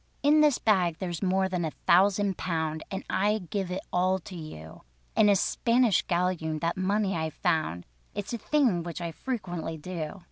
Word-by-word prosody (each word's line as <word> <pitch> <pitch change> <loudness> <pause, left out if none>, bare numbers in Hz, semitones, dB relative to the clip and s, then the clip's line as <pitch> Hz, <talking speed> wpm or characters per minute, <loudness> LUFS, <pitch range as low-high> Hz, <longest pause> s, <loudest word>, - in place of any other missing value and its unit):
"In 300 +2 +5
this 295 -4 +4
bag 185 -7 +2
there 185 -2 -4
is 170 - -5
more 190 0 +2
than 180 -2 -2
a 160 - 0 0.2
thousand 195 +2 +4
pound, 160 -3 -2
And 195 0 -4
I 210 +2 +1
give 190 0 -4
it 180 +1 -3
all 185 +1 +2
to 190 +1 -10
you: 115 - -9 0.3
In 210 -1 +5
a 200 - +6
Spanish 230 +2 +2
galloon 170 -3 -1
that 165 +2 -1
money 195 +1 0
I 160 -1 -1
found, 155 - -1 0.3
(It's 205 +3 -4
a 235 - -2
thing 255 - +2
which 170 +1 -6
I 170 -1 -4
frequently 175 -7 -4
do). 165 +2 -5
185 Hz, 185 wpm, -28 LUFS, 165-205 Hz, 0.3 s, a